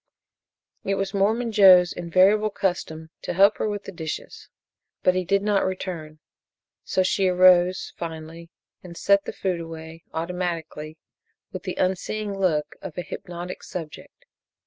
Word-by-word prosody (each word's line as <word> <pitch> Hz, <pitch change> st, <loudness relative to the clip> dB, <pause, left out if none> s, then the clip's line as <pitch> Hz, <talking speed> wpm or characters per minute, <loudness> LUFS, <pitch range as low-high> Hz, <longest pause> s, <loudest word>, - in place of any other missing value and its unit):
It 195 Hz, -, 0 dB
was 195 Hz, 0 st, -2 dB
Mormon 220 Hz, +4 st, +1 dB
Joe's 185 Hz, -4 st, +7 dB
invariable 190 Hz, +5 st, +3 dB
custom 160 Hz, -5 st, -3 dB
to -, -, -4 dB
help 200 Hz, +4 st, +5 dB
her -, -, 0 dB
with 205 Hz, -1 st, -4 dB
the -, -, -8 dB
dishes, 160 Hz, -4 st, -7 dB, 0.5 s
but 185 Hz, -, +4 dB
he 185 Hz, 0 st, 0 dB
did 200 Hz, +3 st, +1 dB
not 205 Hz, -1 st, +2 dB
return, 175 Hz, -5 st, -4 dB, 0.7 s
so 185 Hz, -, +1 dB
she 190 Hz, +1 st, +1 dB
arose, 180 Hz, 0 st, +4 dB
finally, 165 Hz, 0 st, -7 dB, 0.3 s
and 170 Hz, -2 st, -11 dB
set 200 Hz, 0 st, +3 dB
the -, -, -4 dB
food 185 Hz, -3 st, -2 dB
away 165 Hz, 0 st, -9 dB
automatically, 165 Hz, -2 st, -4 dB, 0.5 s
with -, -, -6 dB
the -, -, -5 dB
unseeing 200 Hz, +3 st, -1 dB
look 170 Hz, -6 st, 0 dB
of 170 Hz, -, -8 dB
a 180 Hz, -, -2 dB
hypnotic 175 Hz, +1 st, -7 dB
subject. 165 Hz, -5 st, -9 dB
180 Hz, 145 wpm, -24 LUFS, 165-195 Hz, 0.7 s, Joe's